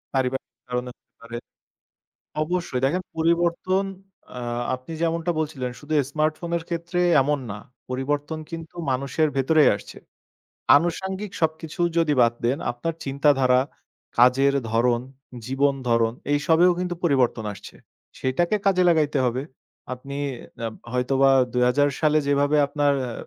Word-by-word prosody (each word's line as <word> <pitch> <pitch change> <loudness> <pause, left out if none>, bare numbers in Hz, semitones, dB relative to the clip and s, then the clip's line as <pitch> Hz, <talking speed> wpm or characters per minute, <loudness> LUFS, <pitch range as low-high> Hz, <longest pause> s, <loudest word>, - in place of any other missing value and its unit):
পারিবারিক 130 0 -1 0.2
কারনেও 125 0 -3
হতে - - -61
পারে। 115 0 -7 1.1
অবশ্যই 170 -6 -2
দেখেন 180 +7 +1 0.2
পরিবর্তন 170 +3 +1 0.5
আ - - -4 0.4
আপনি 130 +5 -12
যে 170 - -1
এমনটা 165 +1 -1
বলছিলেন 135 -5 -3
শুধু 150 +1 -6 0.2
স্মার্টফোনের 160 +2 -1
ক্ষেত্রে 170 +1 -2 0.2
এমন 145 +1 +1
না। 105 - -6 0.3
পরিবর্তন 145 +4 -2
কিন্তু 165 0 -8 0.2
মানুষের 140 +4 0
ভেতরেই 150 +3 +5
আসছে। - - -11 0.8
আনুষাঙ্গিক 190 +5 -2
সবকিছু 160 +1 -2 0.2
যদি 160 -3 +3
বাদ 115 0 +5
দেন 125 +4 +1
আপনার 160 +7 -4
চিন্তাধারা, 135 -2 +3 0.6
কাজের 135 +3 +5 0.2
ধরন, 120 +1 +2 0.5
জীবন 140 +2 +2
ধরণ 115 -1 +3 0.2
এইসবেও 160 +5 +4
কিন্তু 180 -1 -2
পরিবর্তন 130 -7 +2
আসছে। 95 - -12 0.5
সেটাকে 170 +10 +1
কাজে 185 -2 +4
লাগাইতে 155 -4 +2
হবে। 125 +2 -1 0.5
আপনি 135 +2 -8 0.4
অ্যা 115 -1 -2 0.2
হয়তোবা 135 +2 +3 0.2
২০০০ 125 +4 +3
সালে 155 -1 +3
যেভাবে 145 +1 +2
আপনার 145 0 +1 0.2
আ 120 - -5
145 Hz, 125 wpm, -24 LUFS, 130-165 Hz, 1.1 s, ভেতরেই